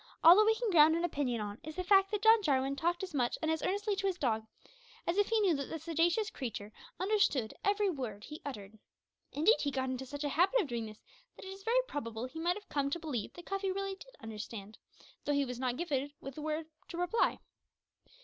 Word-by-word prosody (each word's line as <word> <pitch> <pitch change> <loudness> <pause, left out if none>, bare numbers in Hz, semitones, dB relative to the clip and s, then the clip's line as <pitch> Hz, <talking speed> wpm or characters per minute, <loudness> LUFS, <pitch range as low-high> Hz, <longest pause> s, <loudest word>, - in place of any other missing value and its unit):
All 335 +2 +11
that 425 +2 +5
we 445 - +5
can 455 -2 -1
ground 320 -1 +7
an 335 - -1
opinion 275 -9 -1
on 205 +1 -5
is 310 0 -7
the 365 - -2
fact 390 +1 +5
that 420 -1 -2
John 445 0 +7
Jarwin 275 -5 +1
talked 345 +5 0
as 370 -3 -5
much 245 -4 0
and 315 - 0
as 320 -2 -1
earnestly 405 +3 0
to 390 +1 0
his 375 -2 -1
dog 220 -6 0 0.6
as 340 - 0
if 410 0 +3
he 450 0 +3
knew 380 -4 +4
that 280 -2 -3
that 320 -2 -6
sagacious 340 +6 +1
creature 215 -5 -6 0.3
understood 370 - +2
every 405 +1 +2
word 250 - -4
he 300 +5 -9
uttered. 215 -6 -8 0.5
Indeed, 325 - +4
he 285 - 0
got 260 -1 -2
into 260 +1 -5
such 285 +2 -5
a 290 - 0
habit 365 - +3
of 395 - +1
doing 235 -5 -3
this, 215 0 -13 0.3
that - - -11
it - - -7
is 390 - -12
very 470 +4 +2
probable 230 -5 -4
he 255 +5 -8
might 345 +2 +1
have 420 - -12
come 280 -1 0
to 345 - -2
believe 285 -10 -4
that 350 - -11
Cuffy 390 0 -1
really 390 0 -2
did - - -13
understand, 215 -1 -7 0.5
though 290 - +1
he 285 -1 +2
was 250 -1 -6
not 255 -1 -1
gifted 285 -4 -2
with 275 - -7
the 300 - -8
power 310 +1 -2 0.2
to 340 - -7
reply. 355 +6 +1
315 Hz, 235 wpm, -33 LUFS, 260-390 Hz, 0.6 s, All